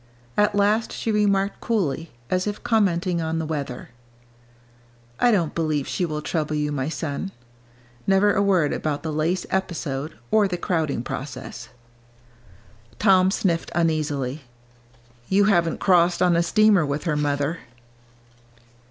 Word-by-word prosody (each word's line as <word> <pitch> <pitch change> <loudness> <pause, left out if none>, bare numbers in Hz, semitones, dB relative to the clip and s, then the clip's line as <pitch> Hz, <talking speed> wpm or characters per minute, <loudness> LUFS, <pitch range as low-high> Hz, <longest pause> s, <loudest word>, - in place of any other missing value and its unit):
At 210 0 +2
last 210 +2 +2
she 225 - -2
remarked 200 -2 +1
coolly, 170 -8 -1 0.2
as 185 +2 +1
if 205 0 -4
commenting 180 -5 +1
on 160 0 -2
the 160 - -2
weather, 140 -5 -5 1.3
"I 245 - +4
don't 175 -9 +1
believe 155 -4 -1
she 180 - -1
will 150 -2 -4
trouble 155 -1 -2
you, 150 0 -1
my 140 0 -2
son." 160 +4 -4 0.8
Never 195 +1 +4
a 200 - +2
word 185 -7 +2
about 150 -2 -2
the 160 -2 -3
lace 165 +4 0
episode 160 -6 -3 0.2
or 215 -2 +4
the 180 -2 -3
crowding 160 -8 -1
process. 130 0 -7 1.3
Tom 190 -3 +4
sniffed 175 -4 0
uneasily. 155 -4 0 0.9
"You 195 +1 +4
haven't 175 -5 +2
crossed 175 -2 +3
on 175 -1 +4
a 170 - +3
steamer 205 +1 +4
with 145 0 -2
her, 160 -4 0
mother." 145 +2 -1
170 Hz, 135 wpm, -23 LUFS, 150-195 Hz, 1.3 s, I